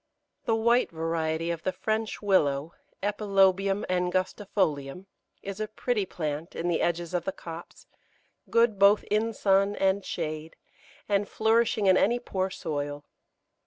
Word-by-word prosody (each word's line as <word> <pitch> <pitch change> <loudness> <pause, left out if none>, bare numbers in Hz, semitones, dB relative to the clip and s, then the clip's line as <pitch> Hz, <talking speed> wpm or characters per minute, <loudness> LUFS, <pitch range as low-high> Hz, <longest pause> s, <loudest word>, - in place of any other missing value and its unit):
The 225 - +2
white 235 +2 +3
variety 165 0 -1
of 170 -1 -4
the 185 - -1
French 215 +3 -2
Willow 150 -6 +2 0.3
(Epilobium 195 -1 +2
angustifolium) 180 -3 -1 0.4
is 200 +1 -6
a 215 - -2
pretty 215 -2 -1
plant 155 -1 -4
in 170 - -2
the 170 - +1
edges 170 0 -1
of 175 -2 0
the 190 - -1
copse, 165 -2 -10 0.6
good 230 -3 +3
both 200 +1 +6
in 220 +2 +2
sun 200 -1 +2
and 195 0 +1
shade, 155 -2 -5 0.5
and 200 0 +1
flourishing 220 -1 +2
in 190 -1 +6
any 235 +4 +3
poor 190 -6 -2
soil. 145 -4 -4
190 Hz, 135 wpm, -27 LUFS, 165-210 Hz, 0.6 s, both